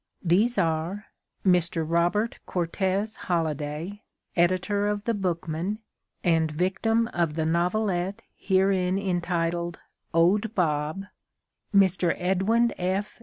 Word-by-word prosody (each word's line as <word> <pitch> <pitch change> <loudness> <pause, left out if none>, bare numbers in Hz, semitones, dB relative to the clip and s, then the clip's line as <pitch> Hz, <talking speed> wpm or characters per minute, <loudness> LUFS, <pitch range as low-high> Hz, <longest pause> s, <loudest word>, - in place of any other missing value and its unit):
These 205 +8 +3
are 170 +4 0 0.4
Mr. 170 -3 +2
Robert 175 +7 +1
Cortes 190 +4 -1
Holliday, 160 +3 -3 0.3
editor 185 +4 +2
of 205 0 -1
The 230 - 0
Bookman 180 0 -2 0.5
and 165 -3 +3
victim 195 +8 +1
of 170 -3 0
the 160 -1 0
novelette 180 +3 0
herein 190 -1 +2
entitled 175 -2 -1 0.3
"Owd 200 +7 +2
Bob"; 155 +1 0 0.7
Mr. 190 -4 +3
Edwin 195 +6 +2
F. 190 +5 -2
180 Hz, 100 wpm, -26 LUFS, 170-200 Hz, 0.7 s, These